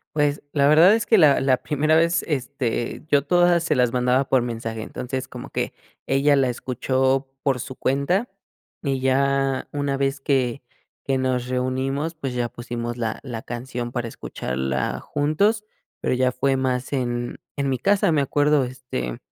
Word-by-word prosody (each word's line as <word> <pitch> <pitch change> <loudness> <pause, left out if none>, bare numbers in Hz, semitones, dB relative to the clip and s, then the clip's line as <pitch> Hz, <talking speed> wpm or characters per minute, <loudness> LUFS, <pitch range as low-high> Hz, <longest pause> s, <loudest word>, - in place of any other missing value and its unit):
Pues, 145 -1 +1
la 140 -1 +3
verdad 165 +7 +7
es 225 - +1
que 220 - +4
la 150 -5 +6
la 130 -1 +3
primera 150 +4 +1
vez, 165 +1 +3
este 130 -5 -2
yo 140 -1 +4
todas 175 +1 +4
se 155 -2 +1
las 125 -2 +2
mandaba 125 +2 +2
por 130 - +3
mensaje. 115 -2 -4
Entonces 130 +3 -5
como - - -8
que - - -2 0.3
ella 140 +2 +3
la 130 -2 +2
escuchó 130 +2 0
por 135 -4 +1
su 130 -1 -7
cuenta, 140 - 0 0.6
y 135 -2 0
ya 135 0 +1
una 145 -1 -1
vez 135 0 -1
que 130 -2 0 0.4
que 135 -1 +1
nos 130 -1 -1
reunimos, 130 +5 -1
pues, 140 -6 -5
ya 120 -1 -1
pusimos 120 0 -5
la 115 -2 -3
la 120 -4 -5
canción 120 0 -5
para 120 -2 -2
escucharla 65 -5 -3
juntos, 180 +10 +1 0.4
pero - - 0
ya 125 0 +2
fue 135 -1 +1
más 130 -1 -1
en 120 -3 -2 0.2
en 140 -1 -1
mi 130 - 0
casa, 200 +1 +3
me 150 -2 +3
acuerdo, 145 0 +2
este 125 - -5
135 Hz, 170 wpm, -23 LUFS, 125-145 Hz, 0.6 s, verdad